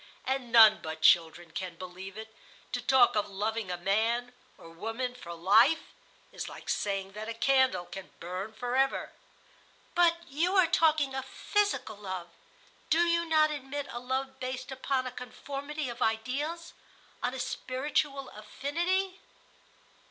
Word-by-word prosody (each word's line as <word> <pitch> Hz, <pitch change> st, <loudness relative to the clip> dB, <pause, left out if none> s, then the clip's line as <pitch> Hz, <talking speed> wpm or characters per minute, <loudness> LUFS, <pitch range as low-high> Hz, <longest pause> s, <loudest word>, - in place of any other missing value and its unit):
And 260 Hz, -2 st, -2 dB
none 225 Hz, -2 st, +8 dB
but 160 Hz, 0 st, -6 dB
children 170 Hz, 0 st, +4 dB
can 180 Hz, +1 st, -5 dB
believe 185 Hz, +2 st, -9 dB
it. 220 Hz, 0 st, -9 dB, 0.4 s
To -, -, -2 dB
talk 260 Hz, -4 st, +5 dB
of 205 Hz, -1 st, 0 dB
loving 210 Hz, +1 st, -2 dB
a 180 Hz, -, -2 dB
man 225 Hz, +7 st, 0 dB, 0.2 s
or -, -, -13 dB
woman 225 Hz, +8 st, -4 dB
for 210 Hz, -9 st, -10 dB
life 220 Hz, -, +4 dB, 0.4 s
is -, -, -5 dB
like -, -, -10 dB
saying 195 Hz, -1 st, -1 dB
that 215 Hz, +2 st, -6 dB
a 230 Hz, -, -4 dB
candle 260 Hz, -7 st, +3 dB
can 195 Hz, +1 st, -9 dB
burn 185 Hz, +5 st, -5 dB
forever." 250 Hz, +4 st, 0 dB, 0.8 s
"But 340 Hz, -1 st, +3 dB
you 335 Hz, +8 st, 0 dB
are 375 Hz, -2 st, +6 dB
talking 310 Hz, -4 st, +3 dB
of 265 Hz, 0 st, -3 dB
physical 410 Hz, -, -1 dB
love. 185 Hz, -4 st, -6 dB, 0.6 s
Do 325 Hz, +2 st, +4 dB
you 340 Hz, 0 st, +2 dB
not 310 Hz, -1 st, +4 dB
admit 285 Hz, 0 st, -4 dB
a 240 Hz, -, -5 dB
love 265 Hz, +1 st, -3 dB
based 255 Hz, +1 st, -4 dB
upon 265 Hz, 0 st, -1 dB
a 255 Hz, -, -4 dB
conformity 280 Hz, +4 st, -6 dB
of 240 Hz, -, -7 dB
ideals, 280 Hz, +10 st, -1 dB, 0.5 s
on 250 Hz, +1 st, -1 dB
a -, -, -5 dB
spiritual 275 Hz, +2 st, -1 dB
affinity?" 345 Hz, -, -2 dB
250 Hz, 145 wpm, -30 LUFS, 210-285 Hz, 0.8 s, none